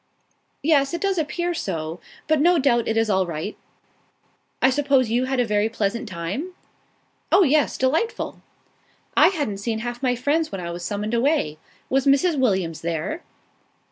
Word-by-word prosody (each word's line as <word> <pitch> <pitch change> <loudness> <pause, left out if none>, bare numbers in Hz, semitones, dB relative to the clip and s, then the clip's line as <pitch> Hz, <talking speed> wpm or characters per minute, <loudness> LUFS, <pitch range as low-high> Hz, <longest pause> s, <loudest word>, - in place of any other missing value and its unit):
"Yes, 290 0 +3
it - - -5
does 390 -3 +1
appear 345 +3 -1
so, 160 - -4 0.3
but 310 -2 +3
no 350 +2 +5
doubt 245 -5 +2
it 225 - 0
is 225 0 +2
all 190 -3 +1
right. 165 +5 -4 1.0
I 260 - +4
suppose 270 -4 +2
you 245 +2 +2
had 265 0 -1
a 245 - +3
very 210 0 +1
pleasant 225 +1 -2
time?" 185 - -4 0.8
"Oh, 395 - +6
yes. 300 -1 +2
Delightful!" 315 - -1 0.7
"I - - +7
hadn't 290 - -1
seen 220 +2 -2
half 240 +2 -5
my 250 -2 +1
friends 295 +6 0
when 195 - -4
I 170 -1 -5
was 175 +1 -6
summoned 205 +4 -3
away. 235 - +1 0.3
Was 270 +1 +1
Mrs. 285 +3 +3
Williams 190 -10 0
there?" 170 - -3
245 Hz, 165 wpm, -23 LUFS, 200-295 Hz, 1.0 s, I